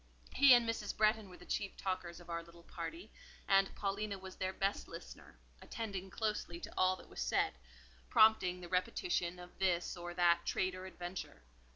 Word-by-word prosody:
He 275 -2 +8
and 240 -1 +3
Mrs. 225 -2 -2
Bretton 215 -1 +3
were 180 - -12
the - - -14
chief 200 -1 -2
talkers 185 -3 -3
of 175 - -14
our 170 -1 -3
little 170 0 -16
party, 170 +5 -7 0.4
and 195 0 +4
Paulina 200 0 -2
was 190 0 -9
their 185 0 -1
best 195 +1 -1
listener, - - -10 0.2
attending 195 -4 -5
closely 210 -5 -2
to - - -8
all 185 0 +4
that - - -14
was - - -7
said, - - +2 0.6
prompting 185 -5 +5
the 175 - -7
repetition 180 - 0
of 180 +1 -12
this 180 -2 +1
or 175 0 -6
that 170 -1 +4
trait 185 0 0
or 185 0 -7
adventure. 175 - -7
185 Hz, 180 wpm, -36 LUFS, 175-205 Hz, 0.6 s, He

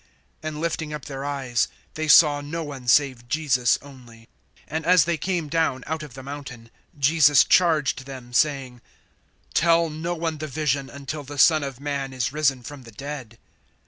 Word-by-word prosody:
(8)And 155 -1 -5
lifting 160 -1 -3
up 150 - -9
their 135 -1 -6
eyes, 135 -5 -1 0.3
they 155 0 -3
saw 150 -1 +6
no 160 +3 -5
one 135 -4 -8
save 130 -2 +3
Jesus 135 -5 +2
only. 120 -5 -15 0.4
(9)And 160 +2 -3
as 175 -2 +5
they 170 0 0
came 170 0 -2
down 145 -5 0
out 160 0 -3
of 145 -5 -10
the 135 - -9
mountain, 135 -5 -9 0.3
Jesus 145 0 +5
charged 155 -7 +2
them, 130 -3 -10
saying: 135 -4 0 0.7
Tell 165 -1 +3
no 165 +3 -3
one 160 -2 -3
the 155 - -4
vision, 140 -2 -1
until 140 +2 -6
the 145 +1 -9
Son 155 +2 +5
of 135 -3 -6
man 140 -2 -3
is 130 0 -2
risen 140 -4 +1
from 145 +3 -9
the 115 -2 -13
dead. 130 -1 -8
145 Hz, 175 wpm, -24 LUFS, 130-155 Hz, 0.7 s, saw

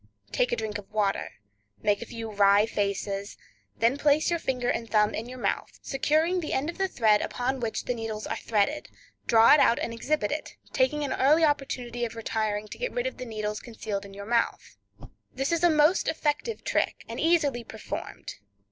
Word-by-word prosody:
Take 250 - +1
a - - +2
drink 215 -2 -3
of 200 - -14
water, 205 -2 0 0.5
make 205 +1 +2
a 235 - -6
few 225 -1 -6
wry 200 0 +5
faces, 200 -1 -2 0.4
then 235 +5 +2
place 300 +3 +3
your 340 - +1
finger 250 -5 -2
and 230 -2 -1
thumb 210 -1 +3
in 230 +3 -4
your 255 - -8
mouth, 245 - -2
securing 310 +6 +1
the 315 - -3
end 295 +5 0
of 340 - -18
the 385 - +2
thread 215 - +3
upon 260 +2 -2
which 230 -2 -2
the 245 - 0
needles 225 -2 -5
are - - -2
threaded, 230 +8 0 0.4
draw 225 0 +7
it 300 - +6
out 235 - +5
and 230 - -3
exhibit 230 -1 -1
it, 305 - -4 0.2
taking 275 +3 +1
an 285 - -1
early 300 +5 +4
opportunity 250 -5 0
of 230 -1 -3
retiring 215 -2 -2
to - - -9
get - - -2
rid - - -2
of - - -3
the 255 - -6
needles 215 -2 -3
concealed 215 -4 -5
in 195 -1 -11
your 200 0 -7
mouth. 235 +1 -1 0.6
This 270 +3 -1
is 335 0 0
a 350 - +7
most 310 +3 +4
effective 320 +8 -1
trick, - - -1
and - - -6
easily 300 -8 +2
performed. 220 -1 -7
240 Hz, 200 wpm, -27 LUFS, 215-295 Hz, 0.6 s, draw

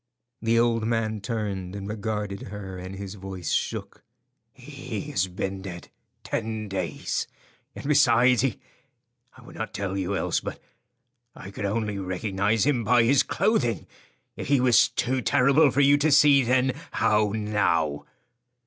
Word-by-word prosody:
The 115 0 +2
old 115 -1 +2
man 110 -2 -1
turned 100 -3 -4
and 100 -1 -6
regarded 105 -1 -4
her, 100 -2 -7
and 95 +1 -7
his 100 0 -7
voice 95 -4 -6
shook. - - -3 0.5
"He - - -7
has 95 -1 +1
been 95 +1 -4
dead 90 -3 -8 0.3
ten 110 -1 -3
days, 95 -1 -3 0.5
and - - -7
besides 125 -4 +4
he—I 130 -6 -8
would - - -13
not - - -5
tell 95 -1 -3
you 95 +1 -2
else, 90 -2 0
but—I 120 -5 -13
could 100 - -5
only 105 0 -2
recognize 100 +3 0
him 135 -5 +1
by 120 +2 +4
his 135 +4 +4
clothing. 125 - 0 0.5
If - - -6
he 140 0 +3
was 120 -2 +5
too 125 +2 -1
terrible 140 +6 +4
for 140 +2 +1
you 140 +1 +5
to 155 +1 +2
see 145 -1 +6
then, 130 +1 +2 0.2
how 105 -1 +2
now?" 85 -9 0
110 Hz, 145 wpm, -25 LUFS, 95-125 Hz, 0.5 s, see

